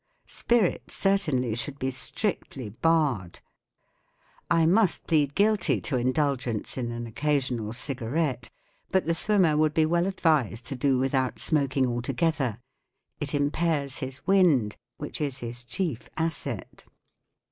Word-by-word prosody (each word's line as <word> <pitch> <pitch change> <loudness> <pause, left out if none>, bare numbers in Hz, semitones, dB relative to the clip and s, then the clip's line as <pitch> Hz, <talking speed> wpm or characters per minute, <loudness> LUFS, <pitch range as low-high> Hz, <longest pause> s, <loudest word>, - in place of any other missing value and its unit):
Spirits 235 -7 0
certainly 150 - +1
should 130 +5 -3
be 130 -1 -2
strictly 130 - -3
barred. 135 - 0 1.1
I 165 -2 +4
must 190 +2 +3
plead 145 -3 +2
guilty 210 -1 +2
to 140 - -2
indulgence 130 -2 0
in 120 -2 -3
an 120 0 -5
occasional 125 -3 -1
cigarette, 130 +1 -2 0.4
but 190 0 +2
the 165 - +1
swimmer 175 -2 +3
would 155 0 +2
be 160 - +4
well 170 +2 +2
ad¬ 190 0 -4
vised 130 - +1
to 135 - -3
do 135 +1 +2
without 130 0 0
smoking 140 -3 +1
altogether. 125 +1 -1 0.6
It 145 0 -2
impairs 145 -1 0
his 130 0 -6
wind, 165 - +3 0.2
which - - -6
is 140 -3 -1
his 120 0 -5
chief 120 - -3
asset. 165 0 -3
140 Hz, 130 wpm, -27 LUFS, 125-165 Hz, 1.1 s, I